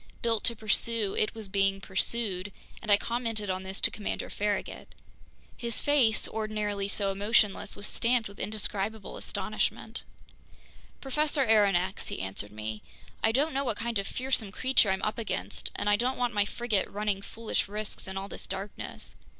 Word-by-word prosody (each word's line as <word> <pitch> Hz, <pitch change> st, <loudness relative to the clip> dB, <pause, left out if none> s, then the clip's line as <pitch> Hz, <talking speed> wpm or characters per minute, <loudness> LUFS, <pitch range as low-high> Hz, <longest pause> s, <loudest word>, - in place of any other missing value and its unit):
Built 225 Hz, -2 st, +2 dB
to 235 Hz, -, +4 dB
pursue, 215 Hz, -1 st, +1 dB
it 215 Hz, -, +1 dB
was 220 Hz, -2 st, -6 dB
being 195 Hz, 0 st, +2 dB
pursued, 195 Hz, 0 st, -1 dB, 0.3 s
and 215 Hz, -, -1 dB
I 200 Hz, -, +9 dB
commented 225 Hz, -3 st, -1 dB
on 185 Hz, 0 st, -2 dB
this 190 Hz, +1 st, -6 dB
to -, -, +5 dB
Commander 210 Hz, -, -3 dB
Farragut. 205 Hz, 0 st, -2 dB, 0.6 s
His 235 Hz, -1 st, -2 dB
face, 265 Hz, -7 st, +3 dB
ordinarily 210 Hz, -2 st, -1 dB
so 200 Hz, 0 st, 0 dB
emotionless, 205 Hz, 0 st, +2 dB
was 200 Hz, -, -3 dB
stamped 235 Hz, 0 st, +2 dB
with 200 Hz, 0 st, -13 dB
indescribable 210 Hz, 0 st, -2 dB
astonishment. -, -, -2 dB, 1.0 s
"Professor 290 Hz, +1 st, +2 dB
Aronnax," 195 Hz, -4 st, +3 dB
he -, -, -3 dB
answered 95 Hz, +2 st, -3 dB
me, 110 Hz, 0 st, -5 dB, 0.4 s
"I 225 Hz, -, +5 dB
don't 280 Hz, +6 st, +2 dB
know 275 Hz, +1 st, +1 dB
what 230 Hz, -6 st, -1 dB
kind 230 Hz, -1 st, -1 dB
of 195 Hz, -, -3 dB
fearsome 250 Hz, -5 st, 0 dB
creature 255 Hz, -1 st, +4 dB
I'm 190 Hz, 0 st, 0 dB
up 215 Hz, -, 0 dB
against, 225 Hz, -, -2 dB
and 205 Hz, -, -2 dB
I 205 Hz, 0 st, +5 dB
don't 250 Hz, +4 st, 0 dB
want 245 Hz, -1 st, +1 dB
my 205 Hz, -1 st, +3 dB
frigate 220 Hz, -2 st, 0 dB
running 205 Hz, -1 st, -1 dB
foolish 225 Hz, +1 st, -2 dB
risks 210 Hz, 0 st, -3 dB
in 190 Hz, 0 st, -5 dB
all 195 Hz, +1 st, -3 dB
this -, -, -5 dB
darkness. 195 Hz, +2 st, -6 dB
210 Hz, 165 wpm, -30 LUFS, 195-230 Hz, 1.0 s, I